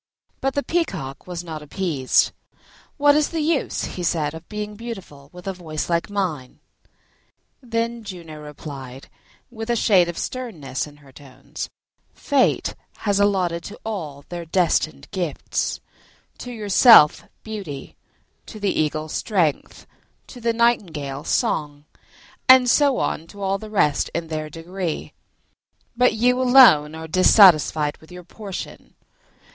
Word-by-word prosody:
But 270 0 -1
the 285 - 0
Peacock 185 - -3
was 175 -1 -5
not 160 -3 -7
appeased. 150 -4 +1 0.7
"What 290 -1 +5
is 300 -1 +2
the 330 - -3
use," 310 -2 0 0.3
said 150 -3 -1
he, - - -6
"of 165 - -16
being 210 0 -5
beautiful, 195 -11 -9
with 180 0 -13
a 195 - -2
voice 165 -2 -5
like 170 +3 0
mine?" 175 -11 -3 1.0
Then 230 -1 -3
Juno 170 -6 -9
replied, 140 -3 -9 0.4
with 225 -1 -7
a 240 - +2
shade 190 -6 +4
of 175 - -6
sternness 160 - -4
in 145 0 -15
her 135 - -16
tones, 135 -1 -9 0.5
"Fate 280 -3 +1 0.3
has 200 -1 +2
allotted 185 -4 +1
to 210 - -9
all 155 -10 -5
their 175 -1 -5
destined 160 -4 0
gifts: 175 -7 -2 0.6
to 250 - -7
yourself 210 -6 +6 0.2
beauty, 195 -11 -7 0.5
to 215 - -9
the 205 -1 0
eagle 155 0 -1
strength, 165 -3 -1 0.4
to 245 - -12
the 230 0 +1
nightingale 165 - 0
song, 150 - -1 0.6
and 255 -1 +8
so 280 +1 +4
on 165 - -2
to 200 - -14
all 195 +1 0
the 215 - -9
rest 150 -9 +1
in 165 -1 -3
their 155 -1 -4
degree; 170 +2 -5 0.8
but 250 -1 +3
you 250 +3 +2
alone 240 - +6
are 160 0 -7
dissatisfied 160 -4 +5
with 160 - -19
your 180 0 -10
portion. 195 +2 -9
180 Hz, 140 wpm, -22 LUFS, 155-225 Hz, 1.0 s, and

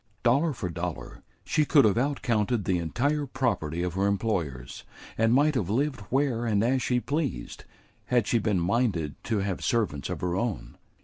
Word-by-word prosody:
Dollar 140 +7 +3
for 115 -9 -4
dollar, 85 0 -5 0.2
she 155 - +2
could 145 -3 +5
have 105 - +3
out 140 +4 -1
counted 110 -3 +1
the 90 -2 +1
entire 140 - -1
property 100 - -1
of 90 -1 -2
her 95 +2 +1
employers; 90 - -2 0.3
and 115 0 +2
might 145 +5 +4
have 105 -9 -1
lived 135 +5 0
where 130 -3 +1
and 105 -3 +1
as 130 +2 +2
she 125 -1 +1
pleased, 135 - -3 0.4
had 120 -4 +2
she 120 - +2
been 105 -3 +1
minded 90 - 0
to 110 -4 0
have 95 -2 -3
servants 100 - 0
of - - -4
her 90 -1 -1
own. 95 - -3
115 Hz, 180 wpm, -27 LUFS, 90-130 Hz, 0.4 s, could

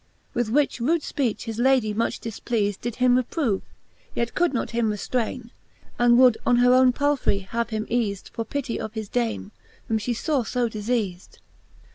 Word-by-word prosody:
With 240 -2 0
which 280 +2 +1
rude 315 +8 +1
fpeach 255 -7 -1
his 225 -1 -5
Lady 250 -4 +3
much 230 +2 -1
difpleafed, 215 -2 -2
Did 240 -1 -3
him 250 0 +4
reprove, 250 - 0 0.5
yet 235 0 -1
could 350 -1 +2
him - - -11
not 235 - -1
reftrayne. 235 +2 -2 0.5
And 240 0 +5
would 250 -3 +6
on 245 - +3
her 245 +1 +5
owne 255 0 +6
Palfrey 285 -5 +1
him 190 - -15
have 235 0 -1
eafed, 215 -2 -2
For 230 - -4
pitty 250 +1 -3
of 220 +1 -6
his 220 -1 -4
Dame, 230 -2 -2 0.4
whom 220 -1 +1
fhe 230 +2 -2
faw 310 +1 0 0.2
io 240 -1 +2
difeafed. 210 -4 -3
235 Hz, 175 wpm, -24 LUFS, 220-250 Hz, 0.5 s, would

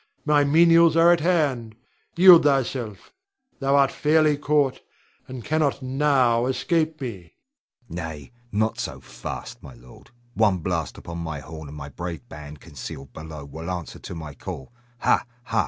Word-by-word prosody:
My 150 -1 +4
menials 165 +2 +5
are 170 +1 +7
at 170 - +1
hand, 145 -10 0 0.4
yield 180 -1 +9
thyself; 130 -7 -1 0.5
thou 135 0 +2
art 140 -1 +4
fairly 155 0 +3
caught, 145 -2 +1 0.5
and 130 -3 -8
cannot 150 -3 0
now 130 -3 +2
escape 155 +5 0
me. 100 - -7 0.5
Hugo. 90 -3 -6
Nay, 80 - -8 0.2
not 110 +2 0
so - - -4
fast, - - -8
my 70 -4 -12
lord. - - -17 0.2
One 105 -5 +3
blast 85 -4 -3
upon 85 0 -7
my 80 -3 -4
horn, 80 +2 -9
and 75 +2 -10
my 70 -1 -7
brave 85 -4 -7
band, 75 +2 -10
concealed 70 -3 -9
below, 80 -2 -9
will 80 +4 -8
answer 90 -3 -5
to - - -8
my 80 -3 -7
call. 65 - -8 0.3
Ha! - - +3 0.2
ha! 115 -2 -1
115 Hz, 155 wpm, -24 LUFS, -, 0.5 s, yield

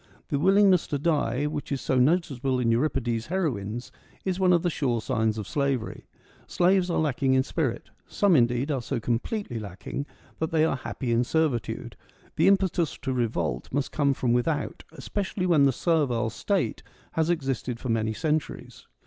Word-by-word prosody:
The 140 - 0
willingness 190 +1 +4
to 145 - -1
die, 145 -4 0
which 150 -1 -4
is 140 - 0
so 130 0 +1
noticeable 135 -3 +1
in 115 -2 +2
Euripides' 120 -2 0
heroines, 125 - -2 0.3
is 190 -1 -1
one 185 -1 +4
of 175 -2 +3
the 175 - +2
sure 125 -7 0
signs 110 0 0
of 105 -2 -5
slavery. 140 -5 -2 0.4
Slaves 180 +1 +2
are 170 - 0
lacking 135 -3 +1
in 130 - +4
spirit; 135 -4 -3 0.2
some, 200 -4 +3
indeed, 125 +2 +2
are 135 -3 -1
so 120 - -3
completely 120 - -2
lacking 110 +8 -6 0.3
that 160 - -1
they 160 -1 +3
are 160 - 0
happy 130 -1 -4
in 115 +1 +3
servitude: 135 -6 -1 0.4
the 165 - +3
impetus 190 -4 +2
to 130 - -1
revolt 85 - -2
must 140 +1 -1
come 140 -2 +1
from 120 -2 +1
without, 145 +5 -1
especially 195 -2 -3
when 160 -6 +4
the 135 - +4
servile 130 -6 +1
state 195 - -1 0.3
has 160 0 0
existed 135 -7 -1
for 130 - -5
many 110 -1 +1
centuries. 155 +6 -3
140 Hz, 170 wpm, -26 LUFS, 120-165 Hz, 0.4 s, willingness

